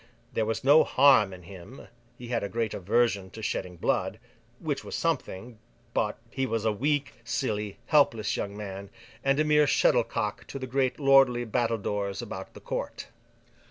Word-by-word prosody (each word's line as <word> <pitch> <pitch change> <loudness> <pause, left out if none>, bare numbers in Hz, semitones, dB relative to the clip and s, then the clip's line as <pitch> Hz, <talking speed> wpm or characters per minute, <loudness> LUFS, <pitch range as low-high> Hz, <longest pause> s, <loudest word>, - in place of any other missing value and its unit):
There 110 -1 0
was 115 +1 -2
no 145 +4 +7
harm 130 -7 +5
in 90 -1 -11
him—he 120 +6 -13
had 120 -2 0
a 100 - -3
great 115 -1 -2
aversion 100 0 +1
to 110 +3 -10
shedding 90 -3 -3
blood: - - 0 0.4
which - - -3
was - - -6
something—but, 115 +1 -3
he 135 0 -1
was 115 -1 -2
a 110 - +3
weak, 140 +3 -1
silly, 105 -5 -2
helpless 115 -8 +3
young 100 0 -4
man, 100 -1 -7 0.3
and 135 +1 +2
a - - +4
mere 150 -1 +4
shuttlecock 115 -7 +1
to - - -6
the 130 - -5
great 130 +1 0
lordly 135 -3 +5
battledores 105 -4 -1
about - - -7
the - - -9
Court. - - -5
115 Hz, 160 wpm, -28 LUFS, 105-130 Hz, 0.4 s, no